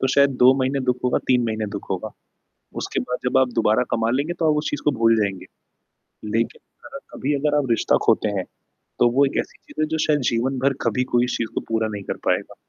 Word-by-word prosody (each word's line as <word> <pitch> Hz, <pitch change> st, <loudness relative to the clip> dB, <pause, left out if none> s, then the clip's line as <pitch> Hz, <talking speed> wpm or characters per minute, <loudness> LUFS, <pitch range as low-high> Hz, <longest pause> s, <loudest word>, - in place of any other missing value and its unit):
तो -, -, +2 dB
शायद 140 Hz, 0 st, +5 dB
2 130 Hz, +1 st, +8 dB
महीने 135 Hz, +2 st, 0 dB
दुख 125 Hz, -, -1 dB
होगा, 125 Hz, -, +2 dB
3 125 Hz, -1 st, +3 dB
महीने 110 Hz, -1 st, -2 dB
दुख -, -, -10 dB
होगा। -, -, -3 dB, 0.7 s
उसके -, -, -2 dB
बाद 125 Hz, -, -3 dB
जब -, -, +2 dB
आप 130 Hz, -, +3 dB
दोबारा 110 Hz, +2 st, +3 dB
कमा 115 Hz, 0 st, 0 dB
लेंगे, 140 Hz, +7 st, -1 dB
तो 165 Hz, -2 st, +1 dB
आप 150 Hz, -, +1 dB
उस 150 Hz, -, -1 dB
चीज़ 145 Hz, -, -4 dB
को 150 Hz, -, +4 dB
भूल 115 Hz, 0 st, +5 dB
जाएँगे। 100 Hz, -3 st, -1 dB, 0.9 s
लेकिन 115 Hz, -, -1 dB, 0.3 s
अगर -, -, -8 dB, 0.2 s
कभी 145 Hz, +3 st, -1 dB
अगर 150 Hz, +1 st, +1 dB
आप 140 Hz, -3 st, 0 dB
रिश्ता 115 Hz, -, +3 dB
खोते 105 Hz, -, +3 dB
हैं, 95 Hz, -, -1 dB, 0.6 s
तो 120 Hz, -, +5 dB
वो 140 Hz, +1 st, +5 dB
एक 135 Hz, -, -3 dB
ऐसी -, -, -5 dB
चीज़ -, -, -7 dB
है, 155 Hz, -, +1 dB
जो 160 Hz, +1 st, -2 dB
शायद 150 Hz, -1 st, +3 dB
जीवन 125 Hz, +3 st, -1 dB
भर 140 Hz, -, +2 dB
कभी 125 Hz, -, 0 dB
कोई 120 Hz, 0 st, +4 dB
चीज़ 115 Hz, -, -2 dB
को -, -, 0 dB
पूरा 110 Hz, -1 st, 0 dB
नहीं 100 Hz, -1 st, -5 dB
कर -, -, -4 dB
पाएगा। -, -, 0 dB
125 Hz, 235 wpm, -22 LUFS, 115-140 Hz, 0.9 s, 2